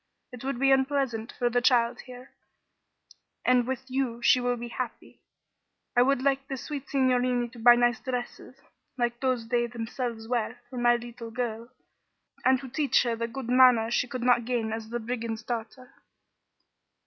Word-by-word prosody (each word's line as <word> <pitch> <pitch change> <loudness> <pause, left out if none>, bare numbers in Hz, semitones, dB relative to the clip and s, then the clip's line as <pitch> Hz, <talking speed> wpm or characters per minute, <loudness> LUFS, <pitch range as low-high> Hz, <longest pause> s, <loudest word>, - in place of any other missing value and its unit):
It 250 0 -10
would 270 -2 -2
be 270 0 +4
unpleasant 265 -4 +1
for 245 - +1
the 245 0 +1
child 240 -1 +3
here, 250 +1 -11 1.1
and 250 -1 +3
with 260 -1 -3
you 255 -3 -2
she 250 - +5
will 245 0 0
be 240 +1 -6
so - - -10
happy. 250 -3 -6 0.7
I 245 - +5
would 260 0 +2
like 275 0 +1
the 270 - -4
sweet 280 +2 -6
signorini 250 -3 +1
to 235 - -13
buy 240 +1 +8
nice 240 -1 +2
dresses, 250 0 -5 0.4
like 240 -1 -1
those 255 -4 -1
they 240 -1 +1
themselves 230 -1 -5
wear, 240 0 -2
for 255 - -7
my 240 0 +4
little 240 -1 -7
girl, 230 0 -4 0.7
and 260 0 +4
to 270 - -8
teach 275 +3 +2
her 235 -2 -1
the 230 0 -3
good 255 +1 -7
manners 250 -3 +5
she 250 - +1
could 245 0 -5
not 245 -1 +4
gain 225 -2 -2
as 220 0 -6
the 240 +1 -3
brigand's 230 -1 -4
daughter. 240 +2 -6
245 Hz, 175 wpm, -27 LUFS, 235-255 Hz, 1.1 s, buy